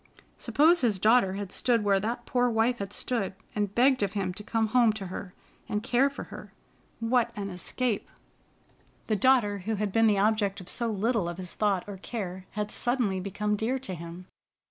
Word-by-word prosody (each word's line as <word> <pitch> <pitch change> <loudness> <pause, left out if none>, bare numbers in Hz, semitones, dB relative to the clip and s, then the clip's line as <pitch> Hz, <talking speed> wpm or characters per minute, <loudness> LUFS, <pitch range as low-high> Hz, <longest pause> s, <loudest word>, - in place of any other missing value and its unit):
Suppose 325 +4 +4
his 225 -6 +2
daughter 215 0 +4
had 200 -1 -5
stood 235 -3 +2
where 200 -1 +3
that 225 +4 -3
poor 245 -1 +2
wife 230 +2 +1
had 200 0 -4
stood, 205 -4 -2 0.2
and 205 -1 -2
begged 255 +1 +4
of 200 -1 0
him 190 -3 -2
to 210 - -8
come 225 0 0
home 240 -1 +4
to 205 -2 -6
her 180 -1 -7 0.3
and 210 +1 -1
care 255 +3 +3
for 280 - -7
her! - - -9 0.5
What 235 +1 +2
an 200 -1 -4
escape! 210 +5 -1 1.0
The 215 - 0
daughter 210 -3 +3
who 220 +4 -2
had 210 -1 -2
been 225 +2 +4
the 210 -2 +3
object 205 -1 +1
of 185 - -9
so 235 - 0
little 215 -3 0
of 175 - -6
his 180 -2 -6
thought 200 -4 +1
or 200 -1 -7
care 190 -3 -6
had 210 0 -2
suddenly 240 -6 +1
become 205 +2 -1
dear 225 +5 -1
to 260 -7 -6
him. 170 +1 -8
210 Hz, 195 wpm, -28 LUFS, 195-240 Hz, 1.0 s, Suppose